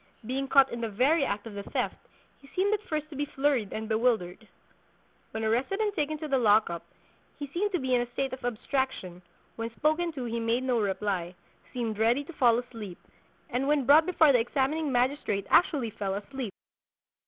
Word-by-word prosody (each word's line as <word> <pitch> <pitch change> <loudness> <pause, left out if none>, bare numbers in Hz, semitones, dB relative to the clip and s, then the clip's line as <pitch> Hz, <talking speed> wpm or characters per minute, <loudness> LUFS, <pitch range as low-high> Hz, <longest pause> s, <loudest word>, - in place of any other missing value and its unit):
Being 270 +3 -2
caught 270 0 +5
in 235 - -4
the 230 - -2
very 270 +9 +3
act 205 -5 -2
of 225 - -8
the 200 - -5
theft, - - -3 0.3
he 275 - -17
seemed 395 +3 +2
at 425 - 0
first 305 -1 -3
to - - -8
be 290 +1 -1
flurried 270 -8 0
and 220 0 -4
bewildered. 220 -3 0 0.8
When 220 0 -4
arrested 245 - 0
and 425 -2 +1
taken 310 -4 -1
to 310 - -5
the 275 -2 +2
lock 215 -4 +4
up, 170 - -5 0.5
he 290 - -4
seemed 360 +9 -2
to 360 - +1
be 260 -2 -1
in 245 - +4
a 240 0 -5
state 270 +1 -2
of 260 - -7
abstraction; 245 -6 -2 0.4
when 230 0 -3
spoken 315 +3 +1
to 260 -4 -5
he 235 0 -2
made 230 +2 0
no 250 -2 +1
reply, 190 -3 -2 0.4
seemed 225 -4 -3
ready 235 +5 +3
to 345 - -11
fall 240 -6 +4
asleep, 225 -7 -7 0.5
and 260 +3 0
when 290 -3 +2
brought 305 +5 +6
before 320 -5 +5
the 250 - +4
examining 280 +5 0
magistrate 245 -5 0
actually 280 -10 +3
fell 195 -2 -3
asleep. 235 +2 -5
250 Hz, 200 wpm, -28 LUFS, 220-285 Hz, 0.8 s, brought